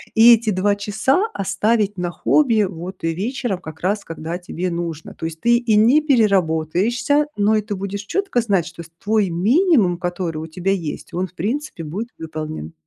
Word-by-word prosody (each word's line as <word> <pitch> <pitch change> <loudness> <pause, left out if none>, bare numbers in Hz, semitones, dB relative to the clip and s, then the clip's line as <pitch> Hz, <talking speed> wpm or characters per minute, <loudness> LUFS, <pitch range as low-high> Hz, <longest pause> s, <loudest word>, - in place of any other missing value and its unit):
И 230 +2 +9
эти 230 -1 +1
2 200 +2 +1
часа 215 - +1
оставить 205 +2 0
на 180 -1 -2
хобби 230 - +2
вот 180 +3 -8
и 165 0 0
вечером, 220 +2 -3
как 160 -2 -10
раз 200 +3 -1
когда 165 +1 -5
тебе 180 0 -4
нужно. 170 -2 -5
То - - -7
есть 160 0 -6
ты 235 0 +4
и 235 -3 +1
не 235 +8 +5
переработаешься, 210 - +2
но 210 +2 +3
и 215 - +2
ты 210 0 -5
будешь 200 +1 -5
четко 390 - 0
знать, 200 -7 +1
что 170 0 -9
с 165 - -16
твой 210 -2 +2
минимум, 215 - +3
который 175 -2 -3
у 160 - -5
тебя 180 +4 -2
есть, 170 -6 -4
он, 185 +2 -1
в 170 - -25
принципе, 230 - -3
будет 195 +10 -5
выполнен. 155 - -6
195 Hz, 185 wpm, -20 LUFS, 170-225 Hz, -, И